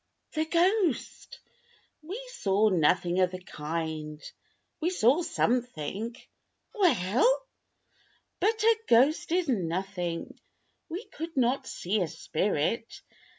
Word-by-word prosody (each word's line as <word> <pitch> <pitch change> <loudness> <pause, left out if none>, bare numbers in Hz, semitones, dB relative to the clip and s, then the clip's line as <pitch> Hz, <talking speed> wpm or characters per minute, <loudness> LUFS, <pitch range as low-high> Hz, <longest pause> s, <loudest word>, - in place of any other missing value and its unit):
"The 315 0 0
ghost." 350 - 0 0.6
"We 365 +9 -6
saw 200 +2 +2
nothing 175 0 +2
of 185 -1 +4
the 185 0 -7
kind. 155 -2 -5 0.6
We 335 - +2
saw 285 -2 +3
something." 235 - -1 0.6
"Well!" 370 - +3 0.9
"But 440 +1 +1
a 455 0 +5
ghost 295 +9 +4
is 355 -1 +2
nothing. 180 -5 -2 0.5
We 360 +8 -5
could 325 -2 -8
not 260 +2 +1
see 200 +4 -1
a 175 - +1
spirit. 200 +8 -2
235 Hz, 105 wpm, -28 LUFS, -, 0.9 s, a